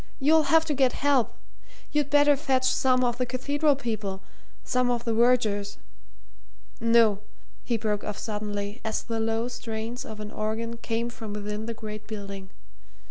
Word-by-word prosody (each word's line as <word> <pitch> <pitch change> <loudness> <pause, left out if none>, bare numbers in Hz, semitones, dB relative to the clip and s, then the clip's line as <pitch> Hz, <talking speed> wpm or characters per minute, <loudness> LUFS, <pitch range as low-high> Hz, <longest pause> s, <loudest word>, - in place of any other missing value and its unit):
you'll 305 +2 +4
have 325 0 +5
to 300 - 0
get 265 -3 +3
help. 275 -6 +2 0.6
You'd 295 -2 +1
better 290 0 +5
fetch 265 -2 +1
some 255 -1 +3
of 240 0 0
the 250 - +2
cathedral 285 +4 +1
people 215 -7 -4 0.4
some 250 0 +1
of 240 -1 0
the 230 - +1
vergers. 220 -4 +2 1.0
No!" 230 -3 +4 0.4
he 235 - 0
broke 210 -2 -1
off 210 - -4
suddenly, 210 0 -4
as 220 -1 -2
the 230 -1 -3
low 225 +1 0
strains 230 0 -5
of 220 -1 -8
an 210 0 -6
organ 225 +2 -3
came 230 +1 -2
from 220 -3 -7
within 210 +1 -4
the 230 - -3
great 215 -1 -7
building. 200 -3 -7
230 Hz, 160 wpm, -27 LUFS, 215-255 Hz, 1.0 s, have